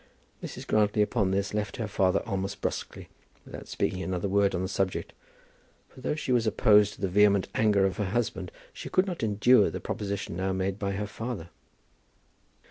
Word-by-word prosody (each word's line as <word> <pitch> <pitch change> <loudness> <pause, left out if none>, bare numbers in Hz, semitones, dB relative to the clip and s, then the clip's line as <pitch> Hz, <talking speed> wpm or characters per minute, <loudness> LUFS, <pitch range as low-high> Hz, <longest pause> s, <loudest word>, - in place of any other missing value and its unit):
Mrs. - - -7
Grantly 105 0 +2
upon 105 -2 0
this 100 +1 -1
left 105 -1 -2
her 115 -3 -2
father 95 -3 +2
almost 100 -2 -3
brusquely, - - -4 0.4
without - - -9
speaking 95 - -2
another 95 0 -2
word 100 0 +2
on 90 - -1
the - - -1
subject; 95 -1 -2 0.8
for, 130 - -15
though 130 - -1
she 150 - -3
was 120 -2 +2
opposed 105 -1 +4
to - - -16
the 95 - +1
vehement 100 +1 +4
anger 105 -3 +3
of 95 - -1
her 105 - -1
husband, 95 -4 -2 0.2
she - - -8
could 185 - +3
not 180 -3 -5
endure 110 +3 +4
the - - -5
proposition 100 -4 -4
now 95 +2 -1
made 95 +1 -2
by 100 -1 -2
her 105 +1 -2
father. 105 -4 -6
100 Hz, 185 wpm, -28 LUFS, 95-110 Hz, 0.8 s, opposed